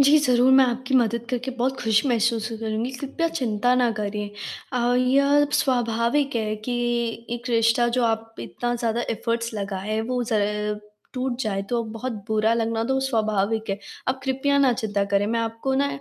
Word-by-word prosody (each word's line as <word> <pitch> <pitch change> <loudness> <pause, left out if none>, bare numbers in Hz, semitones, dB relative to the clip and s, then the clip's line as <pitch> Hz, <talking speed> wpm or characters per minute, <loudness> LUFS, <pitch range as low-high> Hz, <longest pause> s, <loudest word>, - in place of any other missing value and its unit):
जी। 280 +2 +7
ज़रूर 255 -2 +4
मैं 265 0 +7
आपकी 255 +1 -2
मदद 235 -1 +2
करके 250 +1 -2
बहुत 265 +2 0
ख़ुश 225 0 +2
महसूस 230 -2 +1
करूँगी। 225 +3 -2
कृपया 280 +5 -2
चिंता 245 0 +1
ना 240 - +3
करिए 210 0 -3 0.5
और 245 +1 +2
यह 280 +3 +4 0.2
स्वाभाविक 245 +2 +1
है 215 -1 -1
कि 250 - -1 0.6
1 240 +1 -6
रिश्ता 230 +1 +3
जो 245 - +3
आप 225 0 -1
इतना 240 0 -3
ज़्यादा 235 -1 -1 0.2
एफर्ट्स 230 +1 -2
लगाए 200 +1 -3
वो 250 -1 0
जब 210 0 0 0.3
टूट 255 -1 -2
जाए 200 -4 -1
तो 240 -1 0
बहुत 235 +3 -4 0.2
बुरा 220 +1 +2
लगना 225 -1 0
तो 265 +2 +1
स्वाभाविक 220 -4 0
है। 195 - -2 0.3
आप 265 +1 0
कृपया 275 +1 +1
ना 270 -3 +4
चिंता 205 -3 -1
करें 200 +1 +3
मैं 230 +2 0
आपको 230 +4 -2
ना 280 +1 +2
235 Hz, 170 wpm, -24 LUFS, 220-255 Hz, 0.6 s, जी